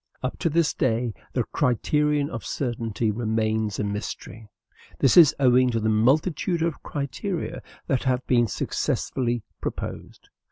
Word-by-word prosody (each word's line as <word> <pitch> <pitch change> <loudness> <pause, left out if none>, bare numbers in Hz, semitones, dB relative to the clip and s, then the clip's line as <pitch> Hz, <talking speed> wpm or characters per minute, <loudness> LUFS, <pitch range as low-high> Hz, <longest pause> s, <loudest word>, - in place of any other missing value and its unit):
Up 130 - -3
to 165 - +1
this 165 0 +2
day, 120 -2 0 0.2
the 125 - +1
criterion 150 +2 +1
of 115 - -5
certainty 115 +1 -2
remains 110 -1 -1
a - - -1
mystery; 105 +2 -5 0.5
this 135 - +3
is 165 -5 +8
owing 125 -1 +5
to 115 -2 0
the 110 0 0
multitude 155 - +2
of 165 -2 -2
criteria 150 +6 -4 0.2
that 135 0 0
have 130 -1 0
been 120 -2 +3
successively 120 +3 -1 0.2
proposed. - - -6
125 Hz, 135 wpm, -25 LUFS, 110-145 Hz, 0.5 s, is